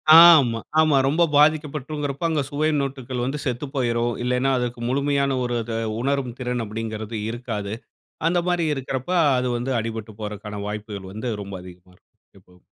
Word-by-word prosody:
ஆமா, 155 -9 +8 0.2
ஆமா. 155 -3 +4
ரொம்ப 160 +5 +3
பாதிக்கப்பட்டுறும்கிறப்ப, 150 -1 +1
அங்க 155 -3 +1
சுவை 155 +2 0
மொட்டுகள் 130 -2 -3
வந்து 145 +3 -2
செத்து 130 +3 -2
போயிரும். 120 -2 +1
இல்லைன்னா 125 +2 +1
அதுக்கு 120 -1 -3
முழுமையான 140 0 +1
ஒரு 120 0 -1
அத 115 - -7 0.3
உணரும் 135 -3 -1
திறன் 125 -2 -2
அப்படின்றது 110 0 -5
இருக்காது. 110 -4 -4 0.5
அந்த 175 +1 +2
மாதிரி 175 -2 +1
இருக்கிறப்ப 130 +3 -4 0.3
அது 125 0 0
வந்து 125 +3 -3
அடிபட்டு 110 -1 -5
போறதுக்கான 105 0 -5
வாய்ப்புகள் 105 -2 -6
வந்து 110 +3 -4
ரொம்ப 100 0 -9
அதிகமா 90 0 -14
இருக்கும். - - -35 0.2
இப்ப. 90 -1 -23
125 Hz, 150 wpm, -23 LUFS, 110-140 Hz, 0.5 s, ஆமா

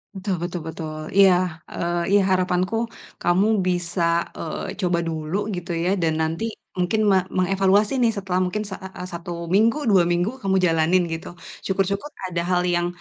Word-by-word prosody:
Betul 190 0 -2
betul 175 -1 -3
betul. 160 -1 -5 0.2
Iya, 195 -2 +8 0.3
eee, 175 0 -2
iya, 205 - +6
harapanku 185 +2 +1 0.5
kamu 185 +4 +3 0.2
bisa, 175 0 -1 0.4
eee, 160 - -4
coba 175 -2 +1
dulu 160 +3 -2 0.2
gitu, 175 0 -5
ya, 170 +2 0
dan 160 -1 +2
nanti 165 +8 -2 0.3
mungkin 180 +5 +1
me 190 - +5 0.2
mengevaluasi, 195 +6 +2
nih, 235 -2 +3
setelah 190 -3 -2
mungkin 210 +4 -2
sa 200 -2 -6
a 190 - -8
a - - -4
1 170 -1 -6
minggu, 220 +7 +4
2 185 -4 +5
minggu 175 +9 0
kamu 195 -5 0
jalanin 165 +2 +3
gitu. 165 +1 -5 0.3
Syukur-syukur 195 +4 0 0.2
ada 170 -1 -1
hal 180 0 +2
yang 175 0 +1
180 Hz, 165 wpm, -23 LUFS, 170-195 Hz, 0.5 s, Iya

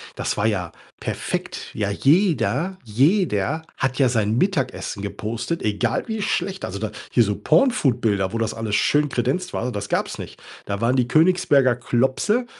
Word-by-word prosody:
Das - - -2
war 105 - 0
ja 95 -6 0 0.3
perfekt. - - -4
Ja, 100 -2 -1
jeder, 160 - +2
jeder 140 - +1
hat 135 0 -1
ja 130 - +5
sein 110 -1 +1
Mittagessen 130 - -1
gepostet, 110 +10 -4
egal 110 - 0
wie 220 -1 -3
schlecht. 190 0 -2
Also 100 +1 -4
da 110 -1 -3 0.2
hier 120 - +5
so 105 -1 -1
porn 160 - +4
food 130 - +1
Bilder, 100 -3 +1
wo 115 - -2
das 115 -1 -1
alles 110 -2 -2
schön 150 +6 +2
kredenzt 130 +10 -1
war, 125 +2 -2
das 100 0 -4
gab's - - -1
nicht. - - -9 0.2
Da 100 0 -3
waren 120 +3 +2
die 125 -2 +2
Königsberger 155 -6 +4
Klopse, 130 - +1
125 Hz, 170 wpm, -22 LUFS, 105-160 Hz, 0.3 s, ja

